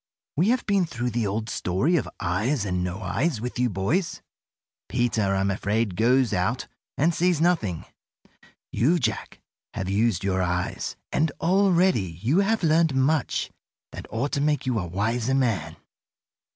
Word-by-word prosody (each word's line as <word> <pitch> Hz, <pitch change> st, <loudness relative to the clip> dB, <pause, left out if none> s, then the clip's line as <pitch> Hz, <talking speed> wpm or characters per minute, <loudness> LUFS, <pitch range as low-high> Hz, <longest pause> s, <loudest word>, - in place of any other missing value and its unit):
We 175 Hz, +8 st, +2 dB
have 250 Hz, +1 st, +1 dB
been 195 Hz, -4 st, +2 dB
through 120 Hz, -3 st, -3 dB
the 115 Hz, -2 st, 0 dB
old 110 Hz, +3 st, -2 dB
story 110 Hz, -, 0 dB
of 145 Hz, -, 0 dB
'Eyes 105 Hz, +7 st, 0 dB
and 90 Hz, -2 st, -1 dB
No 90 Hz, +4 st, -4 dB
Eyes' 150 Hz, -6 st, 0 dB
with 125 Hz, +2 st, -5 dB
you 125 Hz, 0 st, +2 dB
boys. 120 Hz, -, -1 dB, 0.7 s
Peter, 110 Hz, -5 st, +1 dB
I'm 95 Hz, +1 st, +1 dB
afraid, 105 Hz, 0 st, -1 dB
goes 125 Hz, +3 st, +3 dB
out 110 Hz, +8 st, 0 dB, 0.3 s
and 165 Hz, +5 st, +3 dB
sees 175 Hz, -1 st, +2 dB
nothing. 155 Hz, -, +1 dB, 0.9 s
You, 155 Hz, +10 st, +2 dB
Jack, 115 Hz, -8 st, -3 dB, 0.3 s
have 95 Hz, -1 st, -3 dB
used 105 Hz, -2 st, +1 dB
your 95 Hz, -1 st, 0 dB
eyes, 90 Hz, 0 st, -2 dB, 0.2 s
and 155 Hz, 0 st, +1 dB
already 180 Hz, -, +2 dB
you 130 Hz, -, +2 dB
have 205 Hz, +1 st, +1 dB
learned 160 Hz, -2 st, +3 dB
much 135 Hz, +2 st, +1 dB, 0.4 s
that -, -, -9 dB
ought 125 Hz, +6 st, -2 dB
to 140 Hz, -, 0 dB
make 150 Hz, -1 st, +1 dB
you 125 Hz, -3 st, 0 dB
a 90 Hz, -, -4 dB
wiser 110 Hz, +8 st, 0 dB
man. 125 Hz, -7 st, 0 dB
120 Hz, 155 wpm, -25 LUFS, 100-160 Hz, 0.9 s, goes